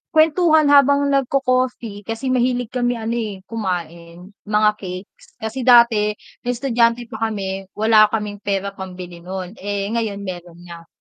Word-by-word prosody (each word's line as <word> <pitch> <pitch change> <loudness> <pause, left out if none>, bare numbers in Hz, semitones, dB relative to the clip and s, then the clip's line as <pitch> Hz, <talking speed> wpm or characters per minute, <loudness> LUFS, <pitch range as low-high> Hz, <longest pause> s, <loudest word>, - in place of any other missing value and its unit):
kuwentuhan 315 -1 +4
habang 280 0 +5
nagko-coffee 255 -6 0
kasi 235 +4 -3
mahilig 245 -1 0
kami 245 -1 0
ano, 225 0 -4
eh, 210 -3 -4
kumain, 175 -3 -5 0.2
mga 210 0 +3
cakes. 185 0 -9
Kasi 220 +2 -5
dati 225 -4 +5 0.3
nung 245 0 -1
estudyante 235 -2 +1
pa 225 0 -2
kami, 195 -2 -4
wala 215 0 +5
kaming 210 -1 -4
pera 200 -1 -2
pambili 180 -2 -9
nun. 185 +1 -6
Eh, 200 +1 -3
ngayon 215 -4 -2
meron 175 -2 -8
nga. 170 -1 -11
215 Hz, 140 wpm, -20 LUFS, 190-245 Hz, 0.3 s, habang